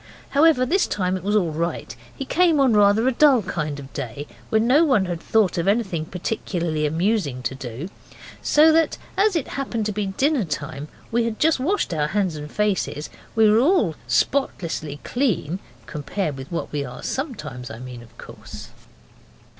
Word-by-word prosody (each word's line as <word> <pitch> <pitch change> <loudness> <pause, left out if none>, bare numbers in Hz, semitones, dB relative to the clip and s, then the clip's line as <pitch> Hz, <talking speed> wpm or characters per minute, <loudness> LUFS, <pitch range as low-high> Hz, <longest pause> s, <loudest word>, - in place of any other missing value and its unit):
However, 285 -3 +4
this 365 +9 +2
time 185 -2 -1
it 185 - -4
was 205 +4 0
all 180 -6 +2
right. 165 -4 -3 0.2
He 270 - -5
came 335 0 +3
on 265 -4 +4
rather 210 +3 +4
a - - +4
dull 265 -3 +5
kind 155 -6 -3
of 140 -1 -11
day, 130 +4 -5 0.2
when 220 +1 +2
no 280 +7 +5
one 255 -11 +3
had 175 -2 -4
thought 210 -6 +2
of 170 - -1
anything 195 -7 +1
particularly 170 -4 -2
amusing 160 - 0
to 125 - -2
do. 130 +3 -6 0.5
So 310 +2 +5
that, 320 -1 +2 0.2
as 400 0 +3
it 320 - -1
happened 245 -5 -3
to 215 - -1
be 205 0 -2
dinner 265 +6 +1
time 150 -2 -5
and - - -25
we 235 0 +2
had 225 -2 -3
just 320 -2 +3
washed 335 - 0
our 150 -2 0
hands 190 -1 0
and 150 0 -7
faces, 200 -7 -1 0.2
we 220 -1 +5
were 210 +1 +5
all 260 - +3
spotlessly 160 - -1
clean 205 - -1 0.3
(com 145 +5 -6
pared 155 0 -2
with 135 +3 -9
what 170 - -3
we 145 -1 -2
are 125 -2 -8
sometimes, 155 - -4
I 110 - -8
mean, 125 0 -9
of 115 -1 -17
course). - - -10
195 Hz, 185 wpm, -23 LUFS, 150-255 Hz, 0.5 s, dull